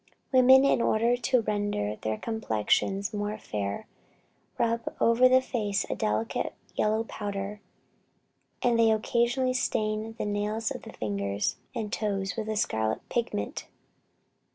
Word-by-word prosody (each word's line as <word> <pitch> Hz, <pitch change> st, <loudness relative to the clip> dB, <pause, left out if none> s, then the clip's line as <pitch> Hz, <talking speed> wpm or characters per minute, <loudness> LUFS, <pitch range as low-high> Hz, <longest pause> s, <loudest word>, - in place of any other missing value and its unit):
Women, 260 Hz, +1 st, +7 dB
in 275 Hz, -, +3 dB
order 230 Hz, +2 st, +3 dB
to 250 Hz, 0 st, +2 dB
render 205 Hz, -, -1 dB
their 110 Hz, 0 st, -3 dB
complexions 195 Hz, -, 0 dB
more 210 Hz, +1 st, -2 dB
fair, 100 Hz, -, -4 dB, 0.7 s
rub 230 Hz, 0 st, +1 dB, 0.2 s
over 235 Hz, +2 st, +5 dB
the 255 Hz, 0 st, +5 dB
face 205 Hz, -6 st, -1 dB
a -, -, 0 dB
delicate 105 Hz, +1 st, -1 dB, 0.2 s
yellow 215 Hz, +1 st, +1 dB
powder; 205 Hz, -1 st, -5 dB, 1.0 s
and 240 Hz, -2 st, +3 dB
they 225 Hz, -1 st, +6 dB
occasionally 240 Hz, +4 st, +1 dB
stain 215 Hz, -2 st, -1 dB
the -, -, -2 dB
nails 210 Hz, +2 st, -1 dB
of -, -, -5 dB
the -, -, -11 dB
fingers 100 Hz, -1 st, -2 dB, 0.2 s
and 220 Hz, -3 st, -3 dB
toes 195 Hz, -3 st, -1 dB
with 220 Hz, -1 st, -4 dB
a 215 Hz, -, -1 dB
scarlet 110 Hz, -, -1 dB
pigment. 225 Hz, -, -2 dB
215 Hz, 130 wpm, -28 LUFS, 195-230 Hz, 1.0 s, Women